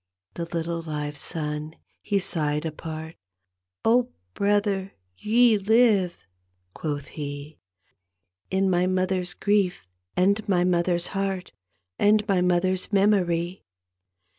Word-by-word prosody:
The 170 -1 -4
litde 170 0 -3
live 150 -1 -3
son 150 +1 -4 0.3
he 205 - 0
sighed 150 -5 -1
apart, 160 0 -6 0.4
" 90 0 -28
Oh, 245 +2 +4 0.2
brother, 200 -1 +1 0.2
ye 225 - +4
live," 205 -4 +3 0.6
quoth 145 -3 -4
he, 145 0 -7 0.4
" 90 0 -54
In 190 0 +1
my 180 -1 +2
mother's 185 -1 -1
grief 200 - +1 0.3
and 200 +4 +3
my 180 -2 +3
mother's 175 -1 +1
heart 195 -2 -2 0.5
And 210 +1 +4
my 190 -3 +2
mother's 180 +2 +1
memory. 185 -3 +2
180 Hz, 115 wpm, -25 LUFS, 155-195 Hz, 0.6 s, Oh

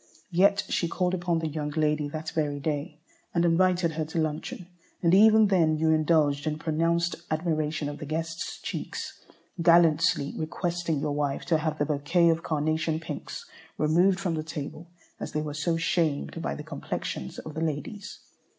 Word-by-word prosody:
Yet 200 +3 +4
she 170 - 0
called 180 +2 0
upon 175 -2 0
the 165 0 -1
young 150 -1 -3
lady 150 -1 0
that 155 +1 -5
very 145 -2 -1
day 150 +1 -3 0.4
and 170 0 +3
invited 175 0 +3
her 155 0 -2
to 160 +2 -6
luncheon, 160 +3 -2 0.4
and 170 0 +4
even 220 +2 +7
then 165 -6 +3
you 160 +1 +2
indulged 155 -2 +2
in 150 0 -1
pronounced 165 +2 0
admiration 155 -2 -1
of 145 0 -6
the 150 - -6
guest's 165 +2 -4
cheeks, - - -5 0.4
gallantly 165 -3 +4
requesting 170 -1 -2
your 150 0 -1
wife 145 -1 -1
to 165 -2 +2
have 155 -1 -2
the 145 - +1
bouquet 165 +4 +2
of 165 0 +2
carnation 155 +1 0
pinks 160 - -7 0.3
removed 175 +5 +3
from 185 -4 -1
the 155 - -1
table, 155 +1 -7 0.3
as - - -6
they 155 - 0
were 150 -1 -4
so 160 +3 0
shamed 165 -3 0
by - - -2
the - - -7
complexions 65 - -5
of 155 - -7
the 160 - -4
ladies. 165 +7 -4
160 Hz, 170 wpm, -27 LUFS, 150-170 Hz, 0.4 s, even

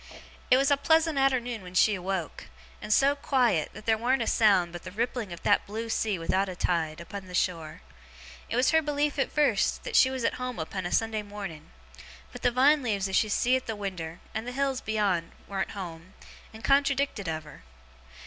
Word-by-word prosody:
'It 255 - +6
was 275 +2 +2
a 285 - +5
pleasant 320 0 +2
arternoon 245 -4 +1
when 180 0 -11
she 210 +3 +5
awoke; 185 -2 -4 0.3
and 210 - -5
so 275 +5 +4
quiet, 250 - +1
that - - -12
there 220 -1 +2
warn't 250 +1 +1
a - - -4
sound 195 -7 +3
but 175 - -7
the 185 - -8
rippling 225 +1 -3
of 170 - -9
that - - +2
blue 225 +3 -5
sea 215 -3 0
without 190 +4 0
a 185 - -6
tide, 165 -3 -1
upon 190 +3 -8
the 180 - -7
shore. 165 -3 -2 0.7
It - - -2
was 255 +4 +3
her 320 0 +4
belief, 295 -1 -1
at 270 - 0
first, 300 -1 +1
that - - -5
she 260 - +6
was 260 -2 -4
at - - +1
home 250 -1 -4
upon 175 +3 -4
a - - -7
Sunday 225 -1 0
morning; 195 -7 -8 0.6
but 245 - -10
the - - +3
vine 275 +5 +4
leaves 205 -6 -1
as 190 - -2
she 215 - +3
see 245 +5 +2
at 260 - -3
the 225 - -3
winder, 180 -5 -5
and 220 +2 -4
the 250 - -4
hills 270 -1 -1
beyond, 200 -6 -1
warn't 195 -1 -2
home, 175 -1 -8 0.4
and 220 +1 -12
contradicted 275 -6 +1
of 160 -1 -3
her. 150 - -14
215 Hz, 210 wpm, -28 LUFS, 185-260 Hz, 0.7 s, It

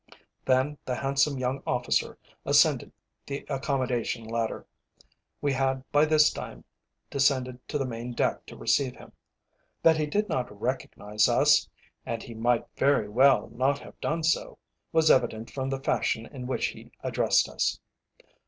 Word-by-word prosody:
Then 135 +3 +1
the 125 - -2
handsome 135 +2 +1
young 130 +1 -2
officer 125 0 0 0.3
ascended - - +3 0.4
the 140 0 -5
accommodation 130 -4 -1
ladder. 115 0 -3 0.8
We 145 -1 +1
had 135 0 0
by 145 +1 +5
this 155 -1 +5
time - - -8 0.5
descended 130 -2 +1
to 150 - -2
the 135 - -1
main 120 0 -5
deck - - -1
to - - -11
receive 135 -3 +1
him. - - -14 0.7
That 160 -1 +6
he 155 -1 0
did 210 +7 0
not 120 -5 -3
recognise 105 -4 0
us - - +4 0.3
(and 115 -1 -4
he 120 - -9
might 120 +1 +1
very 135 -7 +2
well 130 +5 +4
not 135 +3 +1
have - - -14
done 165 +1 -1
so) 160 - 0 0.3
was 160 -1 +4
evident 115 -3 +1
from 135 -1 -3
the 135 0 -2
fashion 110 0 0
in 125 -2 -8
which 130 - 0
he - - -12
addressed - - +2
us. - - -1
130 Hz, 155 wpm, -27 LUFS, 120-140 Hz, 0.8 s, That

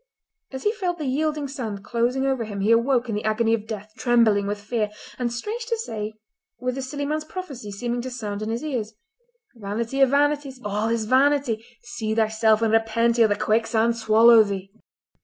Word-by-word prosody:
As 265 -1 -6
he 420 - +3
felt 365 -5 -2
the 305 - -4
yielding 295 +2 -1
sand 225 -8 -5
closing 240 +4 0
over 265 -3 0
him 205 -2 -5
he 210 +3 +2
awoke 240 +2 +3
in 225 - -3
the 210 - -2
agony 225 +1 +1
of 220 -1 -2
death, 215 -1 -6
trembling 225 -5 +3
with 205 0 -2
fear, 210 0 -2 0.3
and, 240 -1 -1
strange 435 - -4
to 465 -2 0
say, 215 - -5 0.4
with 250 +1 -2
the 270 - -4
silly 285 +2 -4
man's 305 +2 -1
prophecy 295 - -7
seeming 240 +4 -3
to 255 - -5
sound 215 -5 -5
in 215 - -3
his 230 +5 -3
ears: 240 -8 -3 0.6
"'Vanity 230 +4 -3
of 270 - +6
vanities! 285 -1 +1
All 210 +2 -1
is 230 -1 0
vanity!' 260 -2 +2 0.2
See 220 -2 -3
thyself 220 0 +2
and 220 -1 +2
repent 230 +1 +2
ere 225 - +7
the 205 - +1
quicksand 225 +2 +1
swallow 225 +1 +6
thee!" 195 -2 -3
230 Hz, 195 wpm, -24 LUFS, 215-265 Hz, 0.6 s, ere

